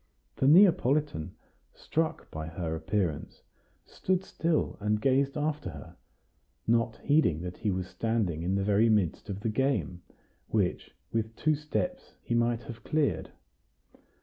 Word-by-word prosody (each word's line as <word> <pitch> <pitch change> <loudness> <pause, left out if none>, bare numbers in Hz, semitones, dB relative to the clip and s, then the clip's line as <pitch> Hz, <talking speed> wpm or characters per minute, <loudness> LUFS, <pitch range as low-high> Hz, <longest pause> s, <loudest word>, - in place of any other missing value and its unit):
The 135 - +2
Neapolitan, 150 - +4 0.4
struck 160 0 -2
by 80 0 -5
her 80 -1 -3
appearance, 90 -3 -2 0.4
stood 185 0 -1
still 165 -4 0
and 105 +1 +1
gazed 135 +4 +2
after 150 0 -1
her, - - -10 0.7
not 115 0 +1
heeding 140 - +3
that 90 0 -6
he 105 - -1
was 95 -1 -1
standing 95 -3 -1
in 90 +3 0
the 100 - +1
very 105 +3 +3
midst 105 -6 +1
of 100 0 -4
the 110 - -1
game, 110 - 0 0.5
which, 100 -5 -1 0.2
with 110 0 -1
two 155 +5 +2
steps, 155 - -3
he - - -2
might 120 0 +1
have 115 -1 -9
cleared. 140 - 0
115 Hz, 140 wpm, -29 LUFS, 95-145 Hz, 0.7 s, Neapolitan